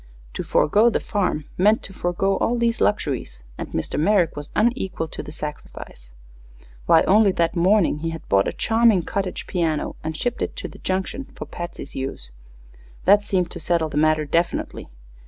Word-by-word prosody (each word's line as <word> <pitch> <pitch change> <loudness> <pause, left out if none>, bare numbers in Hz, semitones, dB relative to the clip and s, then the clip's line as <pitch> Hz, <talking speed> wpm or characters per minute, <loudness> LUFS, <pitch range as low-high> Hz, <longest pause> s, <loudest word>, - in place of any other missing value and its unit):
To - - -3
forego 210 +9 +3
the - - 0
farm 180 -8 -1
meant 210 +4 +4
to 195 - -7
forego 185 +2 0
all 240 - +1
these 235 0 0
luxuries, 125 - -1 0.2
and - - -4
Mr. - - -2
Merrick 180 0 +3
was 145 0 -7
unequal 210 -7 0
to - - -6
the - - -9
sacrifice. 150 - -8 0.8
Why, 160 - +6
only 205 0 +5
that 165 -2 +1
same 170 - -1
morning 185 -4 +3
he 165 +2 -2
had 165 -1 -8
bought 100 0 +3
a - - 0
charming 225 -5 +3
cottage 195 0 -3
piano 165 -4 -1
and 160 0 -4
shipped 245 +5 -2
it - - -2
to - - -5
the - - -13
Junction 190 +8 -2
for - - -6
Patsy's 175 -4 -7
use. 130 - -5 0.7
That 205 +2 +6
seemed 185 -4 -1
to 175 - -4
settle 165 -1 0
the 145 - -4
matter 155 0 +3
definitely. 170 +4 -1
175 Hz, 180 wpm, -23 LUFS, 155-205 Hz, 0.8 s, Why